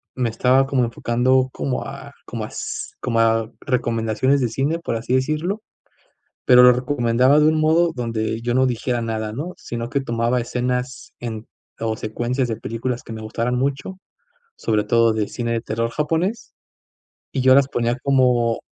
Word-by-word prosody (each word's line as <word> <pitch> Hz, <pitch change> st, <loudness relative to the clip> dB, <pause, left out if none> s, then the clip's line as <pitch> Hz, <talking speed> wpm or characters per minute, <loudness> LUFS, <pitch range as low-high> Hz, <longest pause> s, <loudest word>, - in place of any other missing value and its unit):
Me 125 Hz, -2 st, 0 dB
estaba 130 Hz, +4 st, +3 dB
como 135 Hz, -3 st, +1 dB
enfocando 130 Hz, +3 st, +1 dB
como 130 Hz, -1 st, -3 dB
a -, -, -9 dB
como -, -, -5 dB
as -, -, -6 dB
como 115 Hz, -2 st, 0 dB
a 115 Hz, 0 st, +2 dB
recomendaciones 120 Hz, +1 st, +1 dB
de 125 Hz, -, +1 dB
cine, 140 Hz, +7 st, -1 dB
por 170 Hz, -, -3 dB
así 115 Hz, +2 st, -3 dB
decirlo, 155 Hz, +10 st, -1 dB, 0.9 s
pero 125 Hz, 0 st, +8 dB
lo 125 Hz, -, +9 dB
recomendaba 125 Hz, +1 st, +2 dB
de 150 Hz, -, +5 dB
un 155 Hz, 0 st, +3 dB
modo 165 Hz, +2 st, +3 dB
donde 115 Hz, -2 st, -2 dB
yo 120 Hz, +1 st, -1 dB
no 130 Hz, +1 st, +4 dB
dijera 120 Hz, 0 st, -1 dB
nada, 110 Hz, -1 st, -3 dB
¿no?, 155 Hz, +9 st, -4 dB
sino 115 Hz, 0 st, -5 dB
que 140 Hz, 0 st, 0 dB
tomaba 120 Hz, -1 st, 0 dB
escenas 125 Hz, +2 st, -3 dB
en 115 Hz, -2 st, -6 dB, 0.3 s
o 110 Hz, -1 st, -2 dB
secuencias 120 Hz, +4 st, -2 dB
de 115 Hz, -, -2 dB
películas 115 Hz, +3 st, -4 dB
que -, -, -8 dB
me 110 Hz, -, -6 dB
gustaran 115 Hz, +3 st, -2 dB
mucho, 140 Hz, +8 st, -2 dB, 0.6 s
sobre 105 Hz, -1 st, 0 dB
todo 115 Hz, +1 st, +3 dB
de 110 Hz, -1 st, -1 dB
cine 120 Hz, -1 st, -3 dB
de 115 Hz, -, 0 dB
terror 115 Hz, +1 st, -2 dB
japonés, 165 Hz, -, -2 dB, 0.8 s
y 135 Hz, -, 0 dB
yo 130 Hz, 0 st, +6 dB
las 140 Hz, -1 st, +5 dB
ponía 120 Hz, -2 st, -1 dB
como 125 Hz, -4 st, +2 dB
125 Hz, 170 wpm, -21 LUFS, 115-135 Hz, 0.9 s, lo